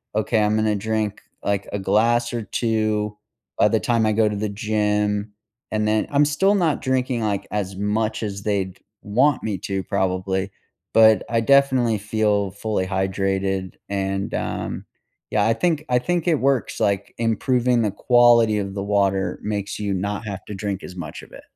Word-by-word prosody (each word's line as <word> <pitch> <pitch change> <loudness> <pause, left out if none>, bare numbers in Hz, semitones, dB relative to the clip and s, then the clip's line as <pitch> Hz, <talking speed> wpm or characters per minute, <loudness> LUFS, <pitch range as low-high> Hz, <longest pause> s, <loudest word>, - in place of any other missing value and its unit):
"Ok, 110 +1 +1
I'm 105 +1 +2
gonna 110 -1 +1
drink, 110 0 -2 0.2
like, 100 -1 -1
a 100 - -1
glass 115 +5 +2
or 120 - -2
2 110 -2 -1 0.4
by - - +6
the - - +2
time 115 -2 +1
I 110 - +2
go 110 0 +3
to 105 - -3
the 105 0 -2
gym, 105 -1 -1 0.4
and 105 0 0
then" 110 0 +2
I'm 145 +1 +4
still 190 +8 +2
not 170 -6 +1
drinking, 130 -2 0
like, 100 -2 -2
as 95 -2 -2
much 110 +2 -1
as 100 -1 -4
they'd 95 -3 -2 0.2
want 130 +7 +2
me 105 -3 -2
to, 95 -1 -3
probably, 95 +1 -1 0.4
but 110 -1 +6
I 115 -1 +2
definitely 130 -3 +3
feel 105 -2 0
fully 100 -1 -2
hydrated, 95 0 -1
and 95 0 -2
um - - -3 0.5
yeah, 105 -1 +2
I 115 - +4
think 160 +1 0
I 125 - +3
think 175 +5 -1
it 165 - +4
works, 135 -2 0
like, 100 -1 0
improving 120 +2 +1
the 105 - 0
quality 120 -1 +4
of 100 -1 -4
the 100 - -3
water 100 -1 0
makes 105 -1 -3
you 100 -2 -1
not 100 +3 -3
have 100 -2 -5
to 105 - -7
drink 100 -1 -4
as 90 - -9
much 80 -4 -7
of - - -16
it. - - -11
105 Hz, 180 wpm, -22 LUFS, 100-115 Hz, 0.5 s, by